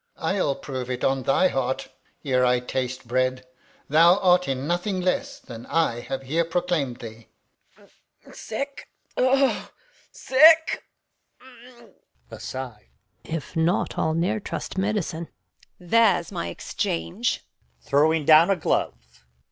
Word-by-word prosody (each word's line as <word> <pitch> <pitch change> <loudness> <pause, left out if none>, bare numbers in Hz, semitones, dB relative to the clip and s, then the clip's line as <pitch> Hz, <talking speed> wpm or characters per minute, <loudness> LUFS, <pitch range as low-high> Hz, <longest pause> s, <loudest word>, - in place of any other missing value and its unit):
I'll 165 -4 0
prove 130 -3 -6
it 125 -1 -4
on 135 0 +1
thy 135 +8 +3
heart, 130 0 -2 0.4
Ere 130 -2 +2
I 125 0 +3
taste 130 0 -4
bread, 130 +1 0 0.4
thou 165 +5 +5
art 180 -2 +3
in 135 0 -2
nothing 175 +4 -1
less 270 +10 -1
Than 115 -1 -11
I 160 -8 +1
have 135 +2 -5
here 160 +6 0
proclaim'd 165 -7 -1
thee. 115 -1 -10 0.5
Reg. - - -22
Sick, 275 +5 -6 0.3
O, 265 +1 +2 0.4
sick! 320 +4 +5 0.6
Gon. 245 -2 -17 0.4
[aside] 125 - -8 0.3
If 160 +1 -6
not, 165 +3 +1
I'll 160 - 0
ne'er 175 +6 0
trust - - -6
medicine. 190 -4 -2 0.5
Edm. 175 -2 -15
There's 220 -7 +3
my 85 - -4
exchange 85 0 -3 0.4
[throws 155 +2 +2
down 160 +4 +7
a 195 - +4
glove]. - - -3
160 Hz, 125 wpm, -24 LUFS, 130-190 Hz, 0.6 s, down